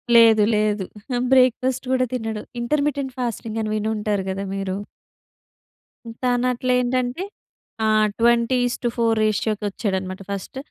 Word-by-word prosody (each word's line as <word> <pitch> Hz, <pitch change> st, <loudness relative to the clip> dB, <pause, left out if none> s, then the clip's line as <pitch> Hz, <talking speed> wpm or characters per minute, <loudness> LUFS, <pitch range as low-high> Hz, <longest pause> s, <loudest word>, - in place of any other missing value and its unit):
లేదు. 225 Hz, -2 st, +7 dB
లేదు. 210 Hz, -2 st, +1 dB, 0.5 s
బ్రేక్‌ఫాస్ట్ 255 Hz, 0 st, +3 dB
కూడా 255 Hz, -1 st, +3 dB
తినడు. 225 Hz, -3 st, -3 dB, 0.2 s
ఇంటర్మిటెంట్ 280 Hz, 0 st, -1 dB
ఫాస్టింగ్ 230 Hz, -2 st, -3 dB
అని 215 Hz, -, -2 dB
విని 215 Hz, 0 st, -1 dB
ఉంటారు 210 Hz, -2 st, -1 dB
కదా! 195 Hz, +1 st, -3 dB
మీరు. 195 Hz, -1 st, -2 dB, 1.5 s
తాను 245 Hz, 0 st, +2 dB
అట్ల 255 Hz, +1 st, -4 dB
ఏంటంటే? 250 Hz, +6 st, -1 dB, 0.6 s
ఆ! -, -, +3 dB, 0.3 s
20:4 235 Hz, -1 st, +2 dB
రేషియోకి 215 Hz, 0 st, 0 dB
వచ్చాడన్నమాట 190 Hz, -2 st, -3 dB
ఫస్ట్. 200 Hz, +6 st, -5 dB
230 Hz, 110 wpm, -22 LUFS, 210-250 Hz, 1.5 s, లేదు